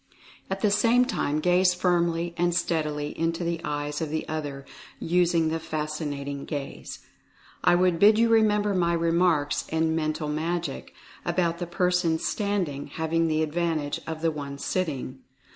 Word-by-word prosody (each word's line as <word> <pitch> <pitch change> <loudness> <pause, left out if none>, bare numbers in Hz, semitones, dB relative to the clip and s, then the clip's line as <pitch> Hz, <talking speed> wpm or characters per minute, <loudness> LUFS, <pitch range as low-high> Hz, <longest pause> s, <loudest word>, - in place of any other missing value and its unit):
At 190 0 -3
the 210 - +3
same 230 +5 +4
time 150 - -1
gaze 180 +2 +3
firmly 170 -1 +1
and 175 0 +1
steadily 150 -4 -1
into 165 +1 0
the 170 -1 -2
eyes 145 -1 -3
of 160 - -2
the 155 +1 -3
other, 145 -3 -4 0.3
using 170 -1 +2
the 165 +1 -1
Fascinating 150 -3 -4
Gaze. 145 -2 -6 0.6
I - - +5
would 180 -1 +2
bid 210 +3 +7
you 230 +1 +4
remember 210 -2 +3
my 170 -2 +2
remarks 165 -3 +1
in 160 0 +1
"Mental 155 -1 -1
Magic" 165 +3 -3 0.3
about 170 -2 0
the 175 - -3
person 180 -1 +1
standing 180 -8 -2
having 160 +2 0
the 155 0 +1
advantage 160 -2 -1
of 160 0 -5
the 165 - +3
one 140 -2 -6
sitting. 140 -5 -3
165 Hz, 150 wpm, -26 LUFS, 150-180 Hz, 0.6 s, bid